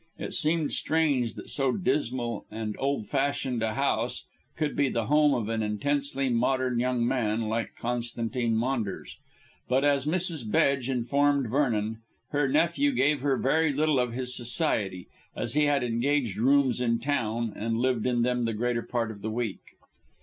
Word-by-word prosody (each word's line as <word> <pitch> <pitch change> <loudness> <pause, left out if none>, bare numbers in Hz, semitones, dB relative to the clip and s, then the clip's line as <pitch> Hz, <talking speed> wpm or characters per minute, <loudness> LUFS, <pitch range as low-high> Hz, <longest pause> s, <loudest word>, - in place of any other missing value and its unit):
It - - -5
seemed 155 0 +1
strange 145 -7 +1
that - - -8
so 135 -2 +1
dismal 125 - -1
and 110 -1 -4
old 135 -5 -1
fashioned 135 -3 -1
a 110 -1 -1
house 125 -4 -1 0.3
should 155 -2 -1
be 140 -2 +2
the 115 -3 -1
home 150 +1 +4
of 115 -4 -2
an 115 0 -1
intensely 135 +6 -1
modern 125 0 +1
young 125 -1 +1
man 115 -4 0
like 110 +1 -2
Constantine 120 0 -2
Maunders. 115 -4 -2 0.5
But, 130 +2 +2
as 140 -1 +2
Mrs. 165 -8 -1
Bedge 135 +2 +2
informed 135 0 +1
Vernon, 115 -5 0 0.3
her 145 -1 +1
nephew 170 - +2
gave 145 - +2
her 135 -1 +1
very 160 +4 +2
little 150 -1 +2
of 125 -2 0
his 125 0 -2
society, 115 - -1 0.3
as 115 0 -3
he 150 +1 +3
had 145 -3 +2
engaged 120 -2 0
rooms 130 +1 +3
in 115 -1 +2
town 115 -4 -1
and 115 +2 -2
lived 125 -1 +1
in 120 -2 +1
them 125 -1 +1
the 115 - -1
greater 120 +1 0
part 115 -2 -2
of 100 -2 -11
the 110 - -3
week. 110 -2 -3
125 Hz, 165 wpm, -27 LUFS, 115-140 Hz, 0.5 s, home